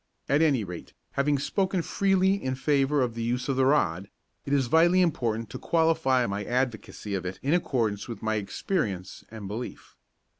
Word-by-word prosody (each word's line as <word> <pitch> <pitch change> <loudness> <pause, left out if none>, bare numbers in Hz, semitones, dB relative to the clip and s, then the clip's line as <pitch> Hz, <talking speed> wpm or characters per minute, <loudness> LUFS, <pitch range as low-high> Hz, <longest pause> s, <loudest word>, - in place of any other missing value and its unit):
At 145 +3 +3
any 140 -8 +3
rate, 90 -3 -8 0.2
having 140 +1 +1
spoken 185 +5 0
freely 195 0 +2
in 130 -10 -2
favour 140 0 +2
of 120 -2 -2
the 115 - -5
use 125 +2 -1
of 135 - 0
the 130 0 +3
rod, 100 - +1 0.4
it - - -3
is 140 -2 +3
vitally 165 +7 +4
important 115 -10 0
to - - -6
qualify 160 -6 +2
my 100 -1 -3
advocacy 120 -3 -2
of 95 - -2
it 90 +1 -5
in 140 +4 +1
accordance 115 - 0
with 115 -4 -7
my 110 0 0
experience 100 - -3
and 110 -3 -8
belief. 110 +5 -7
130 Hz, 180 wpm, -27 LUFS, 110-155 Hz, 0.4 s, vitally